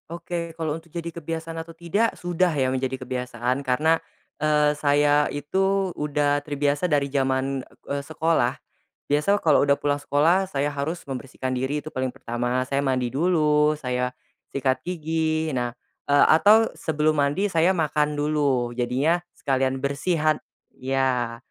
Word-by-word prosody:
Oke 170 Hz, 0 st, -5 dB
kalau 160 Hz, -2 st, -1 dB
untuk 165 Hz, +1 st, -22 dB
jadi 170 Hz, 0 st, -6 dB
kebiasaan 165 Hz, 0 st, -5 dB
atau 165 Hz, 0 st, -11 dB
tidak, 200 Hz, +7 st, 0 dB
sudah 175 Hz, +1 st, +1 dB
ya 130 Hz, -2 st, +1 dB
menjadi 130 Hz, 0 st, -2 dB
kebiasaan 125 Hz, 0 st, -3 dB
karena, 155 Hz, +5 st, +2 dB, 0.4 s
eee, 150 Hz, -1 st, +3 dB
saya 145 Hz, 0 st, +3 dB
itu 190 Hz, +6 st, 0 dB
udah 145 Hz, -1 st, 0 dB
terbiasa 145 Hz, +3 st, 0 dB
dari 145 Hz, -2 st, +2 dB
jaman, 135 Hz, 0 st, 0 dB, 0.2 s
eee, 140 Hz, 0 st, -2 dB
sekolah, 160 Hz, +3 st, 0 dB, 0.5 s
biasa 150 Hz, +8 st, +3 dB
kalau 155 Hz, -3 st, +4 dB
udah 140 Hz, 0 st, +4 dB
pulang 145 Hz, 0 st, -1 dB
sekolah 165 Hz, +7 st, +2 dB
saya 145 Hz, -3 st, -1 dB
harus 145 Hz, +5 st, -3 dB
membersihkan 130 Hz, -1 st, -5 dB
diri 130 Hz, +4 st, -1 dB
itu 155 Hz, -, -8 dB
paling 130 Hz, 0 st, -1 dB
pertama 120 Hz, -1 st, -2 dB
saya 140 Hz, 0 st, +1 dB
mandi 130 Hz, -3 st, 0 dB
dulu, 150 Hz, -1 st, +3 dB
saya, 125 Hz, -2 st, -2 dB, 0.4 s
sikat 130 Hz, -1 st, +1 dB
gigi 160 Hz, -2 st, -1 dB
nah, 120 Hz, -2 st, -2 dB, 0.3 s
eee, 145 Hz, 0 st, +5 dB
atau 210 Hz, +8 st, +6 dB
sebelum 155 Hz, 0 st, 0 dB
mandi 145 Hz, +9 st, +1 dB
saya 170 Hz, +2 st, +3 dB
makan 150 Hz, -3 st, 0 dB
dulu 145 Hz, -5 st, +1 dB
jadinya 130 Hz, +7 st, +1 dB, 0.2 s
sekalian 135 Hz, -1 st, 0 dB
bersihan 155 Hz, +2 st, +1 dB, 0.3 s
ya, 130 Hz, -3 st, -1 dB
145 Hz, 140 wpm, -24 LUFS, 135-160 Hz, 0.5 s, atau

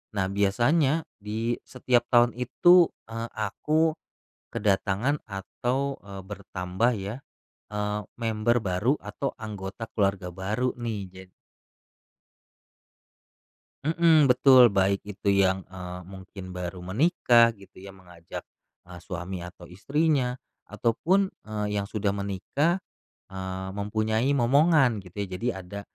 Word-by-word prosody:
Nah, 95 Hz, -2 st, +1 dB
biasanya 130 Hz, +11 st, +2 dB
di 110 Hz, +3 st, -2 dB
setiap 125 Hz, -1 st, +1 dB
tahun 120 Hz, -1 st, +5 dB
itu, 175 Hz, +8 st, +5 dB, 0.2 s
eee, 115 Hz, +1 st, -5 dB
aku 155 Hz, +9 st, +1 dB, 0.6 s
kedatangan 105 Hz, +7 st, +1 dB
atau, 125 Hz, +7 st, -3 dB
eee, 100 Hz, -1 st, -9 dB
bertambah, 95 Hz, +2 st, -2 dB
ya, 100 Hz, +3 st, -5 dB, 0.6 s
eee, 105 Hz, 0 st, -1 dB, 0.2 s
member 115 Hz, +1 st, +1 dB
baru 100 Hz, +6 st, +1 dB
atau 105 Hz, +7 st, -4 dB
anggota 105 Hz, 0 st, -6 dB
keluarga 100 Hz, -4 st, 0 dB
baru, 105 Hz, +8 st, -1 dB
nih. 115 Hz, -4 st, -3 dB
Jad 95 Hz, 0 st, -13 dB, 2.6 s
Mhm, 160 Hz, -1 st, +5 dB
betul, 125 Hz, -3 st, +7 dB
baik 100 Hz, +1 st, +1 dB
itu 105 Hz, 0 st, -3 dB
yang, 95 Hz, -1 st, +3 dB
eee, 90 Hz, -1 st, -7 dB
mungkin 95 Hz, 0 st, -10 dB
baru 90 Hz, 0 st, -6 dB
menikah, 115 Hz, -, +4 dB
gitu, 100 Hz, -3 st, -18 dB
ya, 95 Hz, +1 st, -10 dB
mengajak, 90 Hz, -3 st, -10 dB, 0.5 s
eee, 90 Hz, -1 st, -9 dB
suami 90 Hz, -1 st, -5 dB
atau 90 Hz, -1 st, -12 dB
istrinya, 135 Hz, -, +1 dB, 0.3 s
ataupun, 185 Hz, -, +1 dB, 0.2 s
eee, 105 Hz, -1 st, -2 dB
yang 100 Hz, -, -1 dB
sudah 105 Hz, 0 st, -1 dB
menikah, 100 Hz, -, -1 dB, 0.5 s
eee, 95 Hz, 0 st, -5 dB
mempunyai 110 Hz, +4 st, 0 dB
momongan, 135 Hz, -2 st, +4 dB
gitu, 90 Hz, -1 st, -16 dB
ya, -, -, -7 dB
jadi 125 Hz, -, 0 dB, 0.2 s
ada 100 Hz, +3 st, -7 dB
105 Hz, 115 wpm, -27 LUFS, 95-125 Hz, 2.6 s, betul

